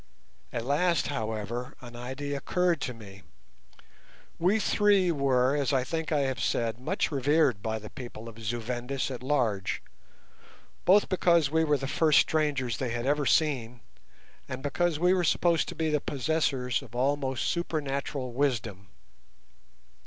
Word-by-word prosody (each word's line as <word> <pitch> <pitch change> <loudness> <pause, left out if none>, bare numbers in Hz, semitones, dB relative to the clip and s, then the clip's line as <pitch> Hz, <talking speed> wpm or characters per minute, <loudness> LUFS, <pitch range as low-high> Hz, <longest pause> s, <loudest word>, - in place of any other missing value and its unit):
At 115 - -3
last, 165 +4 +1
however, 110 -1 -4
an 120 -1 -11
idea 130 +4 -5
occurred 175 +1 0
to 125 - -2
me. 100 -3 -12 1.2
We 185 +6 +3
three 205 -4 +3
were, 135 -3 +2
as 140 -2 0
I 130 -2 +2
think 160 +4 -3
I 150 -2 +2
have 130 -3 -1
said, 115 0 -1
much 130 - -1
revered 140 -4 +2
by 110 +1 -2
the 105 -1 -10
people 120 -3 -9
of 115 0 -10
Zu 115 +2 -3
Vendis 125 +4 -3
at 125 - -6
large, 120 -9 0 1.0
both 200 +3 +5
because 170 -5 +3
we 160 +1 +3
were 150 -2 +2
the 135 - -5
first 155 +2 +3
strangers 145 -6 +1
they 130 - -2
had 120 +1 -3
ever 145 0 +1
seen, 125 -7 +1 0.7
and 130 +1 -5
because 170 +2 0
we 180 +3 +3
were 185 -1 +1
supposed 170 0 +2
to - - -7
be 160 -1 0
the 150 -1 +1
possessors 135 -3 0
of 120 -4 -13
almost 135 0 0
supernatural 140 -6 -2
wisdom. 115 -8 -1
135 Hz, 150 wpm, -28 LUFS, 120-155 Hz, 1.2 s, both